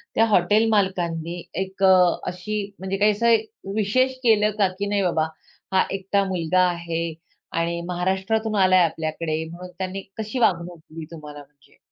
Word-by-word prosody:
त्या 225 - +5
हॉटेल 210 +1 +3
मालकांनी 175 -5 0 0.2
एक 190 +1 -5
अ, 185 -2 +5
अशी 200 +3 -3
म्हणजे 190 +1 -3
काही 210 +1 +4
असं 235 +2 +4 0.4
विशेष 255 +5 +2
केलं 215 -3 +4
का, 200 - +5
की 185 +2 -4
नाही 205 0 0
बाबा 160 -3 +1 0.5
हा 190 - +5
एकटा 195 +1 0
मुलगा 185 -1 +1
आहे 170 -1 -3 0.4
आणि 170 +1 -1
महाराष्ट्रातून 190 +5 -1
आलाय 185 -1 +5
आपल्याकडे, 160 0 -3
म्हणून 180 +2 -9
त्यांनी 190 +1 -4 0.2
कशी 220 +3 -3
वागणूक 175 -5 +1
दिली 160 0 -10
तुम्हाला 150 -2 -9
म्हणजे? 140 -1 -19
185 Hz, 150 wpm, -23 LUFS, 170-205 Hz, 0.5 s, त्या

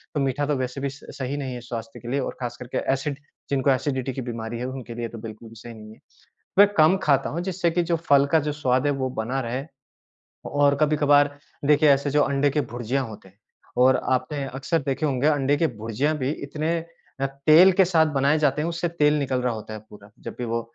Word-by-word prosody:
तो - - +1
मीठा 135 +1 0
तो 150 - +1
वैसे 130 +1 -4
भी 140 - -1
स 140 +2 -13
सही 135 +2 -3
नहीं 135 -3 -4
है 120 - -7
स्वास्थ्य 115 -2 -7
के 120 - -11
लिए 140 - +1
और 130 - -4
ख़ास 120 - -3
करके 125 0 -6 0.2
एसिड 135 +1 -3 0.3
जिनको 140 0 +1
एसिडिटी 130 0 -1
की 130 - -4
बीमारी 115 -1 -5
है 125 - -3
उनके 130 -3 -7
लिए 120 0 -3
तो 115 - -9
बिल्कुल 110 0 -9
भी 115 - -14
सही 115 +2 -10
नहीं 110 0 -12
है। - - -20 0.6
मैं 205 - +9
कम 160 +3 +5
ख़ाता 140 -2 +2
हूँ 165 - -3
जिससे 180 -2 0
कि 175 +1 +1
जो 170 0 0
फ़ल 140 -4 +3
का 160 - +6
जो 150 0 -2
स्वाद 130 -2 0
है 145 - +2
वो 130 -1 -2
बना 125 +3 -2
रहे। 125 +2 -3 0.9
और 145 0 +3
कभी-कभार 145 -1 +3 0.3
देखिए 150 0 +5
ऐसे 140 +1 +2
जो 150 +1 +3
अंडे 140 +1 +1
के 150 +2 0
भुर्जियाँ 125 +2 -2
होते 105 -3 -12
हैं। 95 +2 -26 0.4
और 130 0 +6 0.2
आपने 135 +3 -1
अक्सर 135 +5 0
देखे 140 +3 0
होंगे 135 0 0
अंडे 145 -1 +2
की 165 - +2
भुर्जियाँ 115 +8 -1
भी 130 +2 -1
अ, - - -13
इतने 155 +4 -2 0.4
तेल 155 +7 +5
के 190 +1 +4
साथ 165 -3 +3
बनाए 140 +3 +3
जाते 150 -1 +1
हैं 165 - -1
उससे 170 +1 -2
तेल 150 -3 +2
निकल 130 -2 -1
रहा 125 - 0
होता 110 0 -7
है 105 - -7
पूरा 105 0 -14
जब - - -7
भी 125 - -3
वो 115 0 -1
135 Hz, 235 wpm, -24 LUFS, 125-150 Hz, 0.9 s, मैं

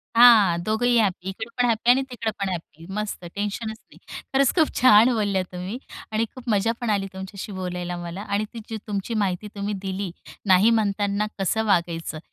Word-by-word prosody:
हां 220 -8 +7
दोघंही 235 +4 +2
हॅप्पी. 190 -3 0
इकडे 220 +4 -5
पण 245 - +3
हॅप्पी 230 0 +1
आणि 265 +2 +4
तिकडं 230 -3 -3
पण 195 - -1
हॅप्पी. 165 -2 -7
मस्तं 210 -4 -4
टेन्शनच 215 +2 -3
नाही. - - -21 0.4
खरंच 270 -1 +4
खूप 320 -4 +3
छान 240 0 +7
बोलल्या 205 -4 +1
तुम्ही 180 +5 -5 0.3
आणि 220 +1 +1
खूप 250 -1 -8
मजा 210 +1 +2
पण 240 - -1
आली 200 -2 +1
तुमच्याशी 190 +2 -7
बोलायला 180 -2 -4
मला. 175 +2 -6
आणि 205 +1 -1
ती 230 - -6
जी 225 - -3
तुमची 205 +2 -3
माहिती 190 +2 -2
तुम्ही 205 +1 -2
दिली, 195 -1 -3 0.3
नाही 190 +3 +6
म्हणताना 205 -1 +1
कसं 220 +4 0
वागायचं" 170 -5 0
205 Hz, 180 wpm, -24 LUFS, 190-225 Hz, 0.4 s, हां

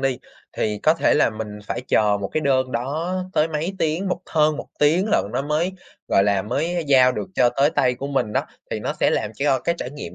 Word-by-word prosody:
đi, 135 -2 0 0.3
thì 105 -1 -2
có 155 - +4
thể 165 - +2
là 150 - +3
mình 110 -1 -6
phải - - -3
chờ 105 -1 +3
một 100 - -3
cái 155 - 0
đơn 130 -3 +1
đó 150 +10 -2 0.2
tới 155 -3 +2
mấy 160 +4 -3
tiếng, 165 +5 0
một 180 - -2
hơn 155 -1 +2
1 - - -6
tiếng 160 +7 +3
lận - - +3
nó 125 - -1
mới, 155 +6 0 0.4
gọi 95 - +4
là, 100 -1 +2
mới 160 - -2
giao 130 -2 +5
được - - -5
cho 125 - +4
tới 140 +2 +4
tay 125 -5 +2
của 135 - -6
mình 135 -6 -1
đó, - - 0 0.2
thì - - -3
nó - - -2
sẽ - - +4
làm 105 - -1
cho 140 0 +1
cái 170 - 0
trải 125 - -5
nghiệm 140 -12 -8
140 Hz, 245 wpm, -22 LUFS, 120-155 Hz, 0.4 s, giao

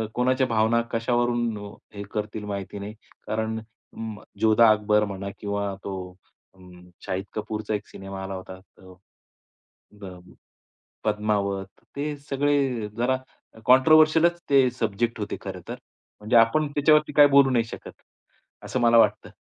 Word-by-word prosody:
कोणाच्या 130 +2 +2
भावना 115 0 +2
कशावरून 120 -1 0
अ, 100 - -11 0.2
हे 100 - -6
करतील 105 0 -4
माहिती 100 0 -5
नाही. 100 +1 -7 0.3
कारण 110 +1 -2
अं, 110 0 -10 0.3
जोधा 110 +1 +5
अकबर 105 0 +2
म्हणा 100 -1 -6
किंवा 100 -1 -3
तो 100 - -5 0.6
अ, - - -23 0.5
शाहिद 95 +2 -3
कपूरचा 110 0 -4
एक 105 - -6
सिनेमा 95 0 -8
आला 95 0 -5
होता 95 0 -8
तर 95 -1 -18
अ, 100 +2 -21
अ, 90 -1 -10 0.9
पद्मावत, 105 -2 -1 0.3
ते 145 +1 -3
सगळे 135 -5 0
जरा 125 +2 +1 0.5
कॉंट्रोव्हर्शिअलच 155 +5 +5
ते 135 -2 +5
सब्जेक्ट 115 +1 -1
होते 105 0 -4
खरंतर. 95 -3 -7 0.4
म्हणजे 110 +3 -1
आपण 115 +7 +4
त्याच्यावरती 150 +1 +3
काही 145 -1 +7
बोलू 140 -1 +6
नाही 120 -2 +2
शकत, - - -9 0.7
असं 130 - -3
मला 115 0 +5
वाटतं. 115 - +3
110 Hz, 135 wpm, -25 LUFS, 100-125 Hz, 0.9 s, काही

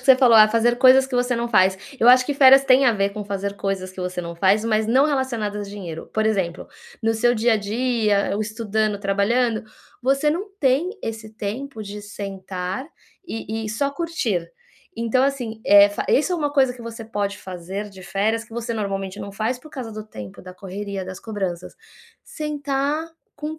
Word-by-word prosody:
que 255 - -12
você 265 - +8
falou: 245 -4 +6
"Ah, 215 0 +8
fazer 230 +2 +2
coisas 260 +1 +6
que 265 - -7
você 245 0 +1
não 235 - -1
faz." 190 -4 +4 0.2
Eu 235 - +5
acho 255 0 +7
que 290 - -1
férias 270 -1 +7
têm 265 0 +5
a 235 - +5
ver 200 -1 +1
com 210 +1 -6
fazer 200 0 -4
coisas 190 -2 -3
que 185 - -8
você 180 0 -3
não 170 0 -6
faz, 195 +5 +2
mas 220 -1 +1
não 260 +5 +4
relacionadas 235 -8 -1
a - - -10
dinheiro. 175 -6 -7
Por 220 0 +1
exemplo, 190 -5 -1 0.4
no 225 0 +2
seu 240 +2 +2
dia 235 +1 +2
a - - +3
dia, 215 -1 0
estudando, 215 -1 -1
trabalhando, 215 +4 +1 0.4
você 275 +4 +2
não 380 +6 -3
tem 280 +5 +2
esse 220 -1 -6
tempo 220 +3 -5
de 205 +1 -7
sentar 195 +1 -5 0.4
e 225 -4 -5
e - - -4
só 275 +6 -1
curtir. 265 - -2 0.5
Então, 235 +3 +1
assim, 245 -6 -3
é, 205 0 +8
fa 205 - -4
isso 305 +6 +2
é - - +1
uma 295 -3 -1
coisa 270 -3 +3
que 245 - -14
você 230 0 -7
pode 205 -3 -3
fazer 190 +3 -6
de 190 -1 -13
férias, 215 +5 -1
que 230 - -19
você 235 0 -3
normalmente 195 -2 -3
não 200 - -6
faz 225 +5 -2
por 310 +3 -15
causa 250 -6 -7
do 215 0 -8
tempo, 105 - -9
da 185 0 -11
correria, 195 +1 -6
das 185 0 -8
cobranças. 190 -6 -4 0.5
Sentar 290 0 -2 0.3
com 310 +2 -5
220 Hz, 200 wpm, -22 LUFS, 200-255 Hz, 0.5 s, você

